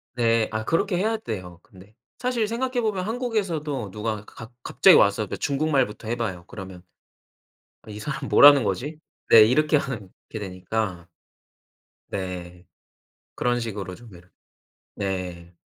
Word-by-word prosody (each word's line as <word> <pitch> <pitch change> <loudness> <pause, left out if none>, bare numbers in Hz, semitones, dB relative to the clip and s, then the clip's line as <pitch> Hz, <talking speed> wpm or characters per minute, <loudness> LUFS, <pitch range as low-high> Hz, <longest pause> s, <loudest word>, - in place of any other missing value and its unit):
네. 115 -2 +2
아 110 0 -2
그렇게 180 - 0
해야 220 +5 +1
돼요 90 - -7
근데. 105 -1 -18 0.2
사실 245 -3 0
생각해보면 230 -5 -1
한국에서도 185 - -2
누가 110 +2 -3
가 - - -18
가 - - -23
갑자기 - - +5
와서 - - +3
그 - - -6
중국말부터 135 -6 0
해봐요. 110 -7 -3
그러면 95 -3 -9 1.0
'아 - - -13
이 105 - -7
사람 135 +5 -5
뭐라는 145 -1 +8
거지?' 125 +11 -3 0.3
네 110 - +10
이렇게 150 +7 +3
하는 125 -9 -3 0.2
게 110 - -5
되니까. 95 -2 -4 1.0
네. 90 -2 -6 0.7
그런 120 0 0
식으로 100 -5 -5
좀 115 +1 -15
이러 90 +1 -16 0.7
네. 90 -3 -4
115 Hz, 280 characters per minute, -24 LUFS, 95-150 Hz, 1.0 s, 네